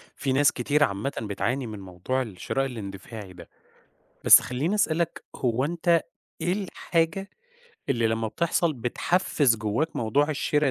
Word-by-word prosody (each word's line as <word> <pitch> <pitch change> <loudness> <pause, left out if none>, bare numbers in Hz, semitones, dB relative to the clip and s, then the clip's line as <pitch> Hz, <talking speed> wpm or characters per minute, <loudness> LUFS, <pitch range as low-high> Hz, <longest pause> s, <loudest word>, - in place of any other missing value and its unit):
في 135 -2 -1
ناس 145 +2 +4
كتير 145 +4 +1
عامةً 105 +2 -1
بتعاني 115 +5 -2
من 105 -2 -7
موضوع 95 +8 -3
الشراء 120 +4 -2
الاندفاعي 100 -4 -7
ده. 85 -2 -13 0.8
بس - - +10
خلّيني 140 +10 -1
أسألك 170 -6 0
هو 125 +1 0
أنت 170 +1 +2 0.4
إيه 175 +2 0
الحاجة 185 -2 -1 0.6
اللي 115 -4 +2
لمّا 110 0 0
بتحصل 170 +3 +1
بتحفز 135 +1 +1
جواك 110 +9 -1
موضوع 140 +7 +1
الشرا 150 -1 +1
130 Hz, 135 wpm, -26 LUFS, 110-160 Hz, 0.8 s, بس